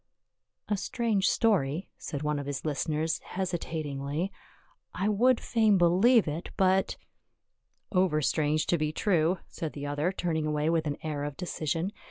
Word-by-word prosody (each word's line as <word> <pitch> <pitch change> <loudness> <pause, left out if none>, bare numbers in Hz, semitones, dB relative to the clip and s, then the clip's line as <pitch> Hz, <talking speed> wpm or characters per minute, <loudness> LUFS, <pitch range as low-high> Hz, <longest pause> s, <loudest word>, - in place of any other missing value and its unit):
"A 205 - 0
strange 215 -2 +1
story," 185 - +1
said 145 0 -5
one 150 -1 0
of 140 - -6
his 145 0 -4
listeners 155 +2 -1
hesi 185 -2 -1
tatingly. 150 +3 -3 0.3
" - - -38
I - - +2
would 235 +4 +4
fain 220 -4 +3
believe 190 +7 +5
it, 155 +4 -4
but 190 0 +2 0.3
— - - -51
" - - -52
" - - -45
Over 180 -5 +2
strange 150 +3 +1
to 170 - +1
be 155 0 0
true," 175 0 +2
said 160 -2 -5
the 145 -1 -6
other, 145 +5 0
turning 160 -5 -1
away 150 +1 +1
with 160 -2 +1
an 145 - -2
air 150 -2 -3
of 145 -1 -5
decision. 170 0 -2
160 Hz, 175 wpm, -29 LUFS, 150-190 Hz, 0.3 s, believe